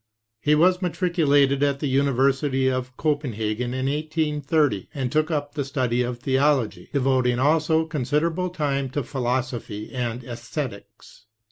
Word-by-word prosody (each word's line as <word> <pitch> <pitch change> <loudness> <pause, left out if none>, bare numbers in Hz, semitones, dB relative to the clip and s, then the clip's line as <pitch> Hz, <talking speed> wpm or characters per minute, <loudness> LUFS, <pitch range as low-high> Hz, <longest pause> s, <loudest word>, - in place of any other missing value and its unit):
He 150 +6 +3
was 180 +4 +4
matriculated 150 -7 +2
at 140 -1 +1
the - - -2
University 135 0 +2
of 130 0 -2
Copen 145 -5 0
hagen 110 +3 -2
in 130 0 -2
1830, 150 - 0
and 130 -3 -2
took 155 +1 +1
up 145 -2 -2
the 145 -2 -2
study 130 -3 0
of 125 0 -2
theology, 130 -7 +1
devoting 130 -3 +2
also 160 +4 +2
considerable 160 +4 -1
time 140 -6 -1
to 145 +2 -2
philosophy 120 -4 -3
and 120 -1 -3
esthetics. 115 -3 -7
135 Hz, 135 wpm, -24 LUFS, 125-150 Hz, -, was